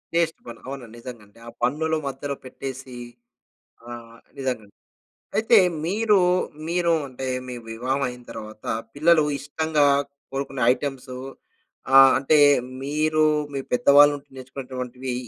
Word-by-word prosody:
Test 165 -1 +1
bun, 115 -1 -9
అవును. 135 -2 -6
నిజంగా 120 -3 -10 0.2
ఆ - - -6
బన్నుల 155 +6 +1
మధ్యలో 140 +1 -4
పెట్టేసి 130 0 -8 0.9
ఆహ్, 115 -1 -10 0.2
నిజంగాండి. 125 -6 -4 0.6
అయితే 225 +1 +5 0.3
మీరు, 210 +3 +2 0.5
మీరు 170 0 +1 0.2
అంటే 130 0 -6 0.2
మీ 125 - -6 0.2
వివాహం 130 +5 -2
అయిన 125 0 -8
తరువాత 110 -1 -10 0.3
పిల్లలు 155 +2 +4 0.2
ఇష్టంగా 150 +1 0 0.5
కోరుకునే 135 -1 -4
ఐటెమ్స్ 135 -1 -6 0.8
ఆహ్, 135 0 +9
అంటే 150 +3 +3 0.4
మీరు 155 +2 +1 0.3
మీ 140 - -2
పెద్దవాళ్ళు 145 +3 +6
ఉండి 140 -1 -18
నేర్చుకునేటువంటివి, 130 -1 -6
135 Hz, 115 wpm, -24 LUFS, 125-150 Hz, 0.9 s, ఆహ్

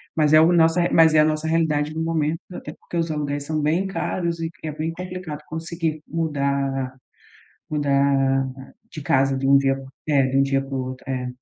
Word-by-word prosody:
mas 150 -2 +3
é 155 - +9
o 160 +2 +5
nossa 170 +1 +4
mas 160 -1 +6
é - - +6
a - - +4
nossa 155 0 -1
realidade 155 -2 +1
no 160 - -4
momento, 165 -1 0
até 150 - -7
porque - - -11
os 165 0 0
aluguéis 145 -1 -2
são 155 +1 -2
bem 165 +6 +1
caros 170 -3 -2
e 165 0 -2
é 155 - -3
bem 155 +2 -3
complicado 180 -4 -6
conseguir 160 -1 -4
mudar 140 -4 -1 0.8
mudar 140 -2 +2 0.4
de 155 - -7
casa 135 -1 +2
de 135 - -1
um 140 +1 +6
dia 135 -1 +2 0.3
é, 140 -3 +4
de 130 +1 -1
um - - +5
dia 135 0 +1
para 135 0 -7
o 135 - -1
outro, 130 0 -8
é. 130 -1 -2
150 Hz, 200 wpm, -23 LUFS, 140-165 Hz, 0.8 s, é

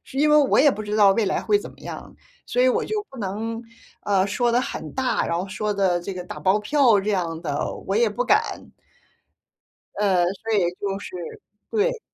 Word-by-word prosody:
是 265 - -12
因 300 +1 +4
为 300 - +6
我 285 -3 +4
也 290 +2 +6
不 215 - -5
知 210 0 -3
道 200 -2 +6
未 215 +1 +1
来 190 - 0
会 415 - +3
怎 410 - -9
么 - - -20
样。 - - -9 0.3
所 250 - +1
以 255 - +5
我 - - +1
就 425 -1 -3
不 265 - -11
能， 220 +3 -4 0.4
呃， 195 -2 +2
说 235 +4 0
得 245 - +3
很 - - -6
大， 260 -1 0
然 170 - -1
后 180 +3 -2
说 210 +2 -2
得 185 -3 +1
这 190 +3 -6
个 180 - -5
打 - - -8
包 195 +3 +2
票 245 -2 +4
这 210 +2 -2
样 170 -4 -2
的， - - -2
我 - - +1
也 470 0 +4
不 - - -2
敢。 - - 0 1.2
呃， 190 -4 +2
所 200 +5 -4
以 185 -5 +2
就 195 -1 -2
是 - - -9 0.6
对。 460 +2 +1
210 Hz, 230 characters per minute, -23 LUFS, 195-265 Hz, 1.2 s, 为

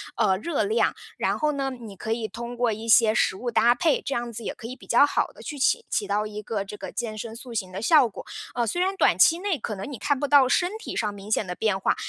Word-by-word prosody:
呃， 190 0 +2
热 310 - -1
量。 440 +3 +1 0.2
然 - - 0
后 305 -1 +2
呢， 275 -1 -1
你 230 -6 -9
可 220 +3 -5
以 225 -1 -1
通 235 +2 -7
过 240 -1 +1
一 220 +2 -6
些 225 -1 +6
食 210 - +2
物 245 +4 -4
搭 235 +1 +5
配， 305 +4 +2
这 275 - -3
样 240 0 -3
子 230 0 -7
也 - - -3
可 230 - -9
以 255 - -7
比 - - -16
较 240 - +6
好 - - -1
地 - - -15
去 295 - -6
起 460 - +2
起 205 - -1
到 205 +2 0
一 210 0 -7
个 210 -1 -3
这 205 - -8
个 - - -7
健 220 -2 -4
身 225 +1 -6
塑 240 0 -9
型 190 -5 -3
的 185 - -5
效 280 +2 +5
果。 - - -10 0.3
呃， 240 -1 +1
虽 350 - -1
然 380 +1 +1
短 - - +3
期 335 +1 +5
内 385 -3 -1
可 215 - -4
能 195 +6 -6
你 265 - -6
看 285 +4 0
不 290 - -1
到 280 -2 +6
身 355 +7 +2
体 445 - -7
上 210 -2 -1
明 200 +1 -10
显 215 - +2
的 180 - -4
变 210 -2 0
化， - - +1
235 Hz, 310 characters per minute, -25 LUFS, 215-280 Hz, 0.3 s, 些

